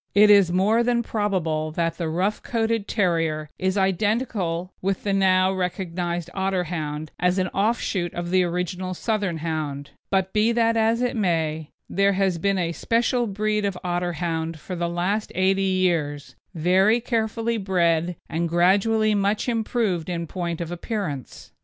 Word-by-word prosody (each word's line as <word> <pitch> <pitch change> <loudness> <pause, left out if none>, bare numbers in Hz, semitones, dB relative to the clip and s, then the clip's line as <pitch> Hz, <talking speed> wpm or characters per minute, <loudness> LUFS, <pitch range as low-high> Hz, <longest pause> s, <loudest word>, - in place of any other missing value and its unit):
It 210 +1 +7
is 200 -4 +6
more 200 +6 +3
than 235 0 +1
probable 180 -9 -1
that 165 +1 -1
the 165 -2 -1
rough 185 +6 -1
coated 225 -2 -1
terrier 165 -6 0
is 190 +1 0
identical 190 -2 0
with 195 0 -1
the 200 - 0
now 190 -1 +3
recognised 175 -2 -3
Otterhound 170 -6 -2
as 180 +1 +2
an 185 -1 0
offshoot 195 -4 0
of 175 0 -4
the 185 0 +4 0.5
Southern 205 -5 -1
Hound; 150 -3 -4 0.2
but 190 -1 0
be 215 +2 +3
that 230 -1 +2
as 225 +2 +2
it 250 - 0
may, 160 -6 0 0.2
there 200 +1 +2
has 190 -3 +1
been 195 +3 +1
a 170 -2 0
special 235 +6 0
breed 210 +1 -1
of 200 -2 -1
Otterhound 170 -2 -2
for 180 +4 -7
the 170 0 -1
last 185 +5 -1
eighty 190 +1 +2
years, 175 -7 0 0.2
very 190 +7 +3
carefully 230 0 -1
bred 175 -3 +1
and 170 +1 -2
gradually 205 +6 +3
much 205 +2 0
improved 220 -7 -1
in 170 -1 -2
point 170 0 -4
of 170 0 -4
appearance. 175 - -5
185 Hz, 150 wpm, -24 LUFS, 170-210 Hz, 0.5 s, It